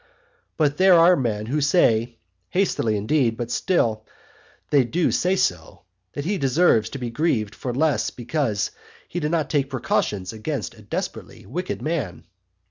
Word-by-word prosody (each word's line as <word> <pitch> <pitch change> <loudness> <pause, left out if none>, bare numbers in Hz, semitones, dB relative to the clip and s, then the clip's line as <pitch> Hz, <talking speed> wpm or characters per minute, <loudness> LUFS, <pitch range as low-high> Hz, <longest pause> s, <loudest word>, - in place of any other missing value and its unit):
But 145 -2 +1
there 185 -1 +6
are 170 +2 +6
men 110 -7 -2
who 145 +6 -1
say, 120 -7 +2 0.3
(hastily 165 - +1
indeed, 115 +1 +1
but 120 0 -4
still 115 - +1 0.7
they 140 -3 +5
do 165 +8 0
say 185 +2 +1
so,) 90 - -2 0.3
that 145 - -5
he 195 +2 -1
deserves 135 -6 +3
to 140 - -6
be 120 -3 -4
grieved 115 -6 0
for 125 - -4
less 145 +3 +1
because 120 -5 -2 0.4
he 175 - -4
did 150 -2 -1
not 160 -3 -1
take 140 -3 +1
precautions 105 -7 -1
against 130 +6 -4
a 110 - -16
desperately 100 - -6
wicked 180 +1 -4
man. 120 - -3
135 Hz, 155 wpm, -23 LUFS, 110-160 Hz, 0.7 s, there